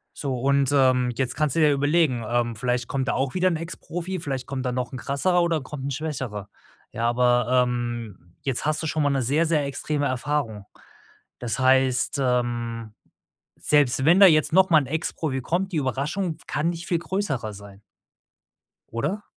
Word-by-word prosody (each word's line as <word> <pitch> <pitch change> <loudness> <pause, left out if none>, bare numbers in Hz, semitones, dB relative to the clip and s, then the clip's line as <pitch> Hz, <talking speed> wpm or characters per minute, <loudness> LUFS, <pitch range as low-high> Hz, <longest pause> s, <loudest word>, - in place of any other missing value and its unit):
So 135 -3 -3
und, 140 +1 +2
ähm, 130 -3 +3
jetzt 125 -1 -2
kannst 150 -3 0
du 165 - +2
dir 150 -1 +5
ja - - +3
überlegen 145 -4 +1
ähm, 120 0 0
vielleicht 125 +1 -1
kommt 135 -1 -2
da - - +1
auch 135 -1 -1
wieder 185 0 +2
'n 175 - +1
Ex 165 +2 -5
Profi, 175 +2 -5
vielleicht 135 -4 -4
kommt 135 -2 -4
da 125 - 0
noch 125 0 -3
'n 130 - -4
krasserer 175 +8 +1
oder 165 -3 +1
kommt 135 0 -8
‘n - - -2
schwächerer. 130 -9 -4 0.4
Ja, 115 +1 0
aber, 120 -1 +2 0.2
ähm, 120 -7 -5
jetzt 135 -1 -2
hast 155 +1 0
du - - -1
schon 155 - -1
mal 145 - +2
'ne 135 -2 0
sehr, 150 +7 +2
sehr 155 -3 +1
extreme 145 +1 -2
Erfahrung. 130 -5 -2 0.7
Das 120 0 -3
heißt, 130 0 +3
ähm, 120 -3 -1 0.6
selbst 140 -3 +2
wenn 170 +5 +5
da 195 - +10
jetzt 155 -4 +4
noch 190 +1 +5
mal 160 - +7
'n 140 - -4
Ex-Profi 155 -2 -2
kommt, 180 +8 -1
die - - -2
Überraschung 150 - -2
kann 160 +4 0
nicht 170 0 -6
viel 170 - +1
größer 165 - -3
sein. 100 -1 -12 1.1
Oder? 155 - -2
135 Hz, 190 wpm, -24 LUFS, 120-155 Hz, 1.1 s, da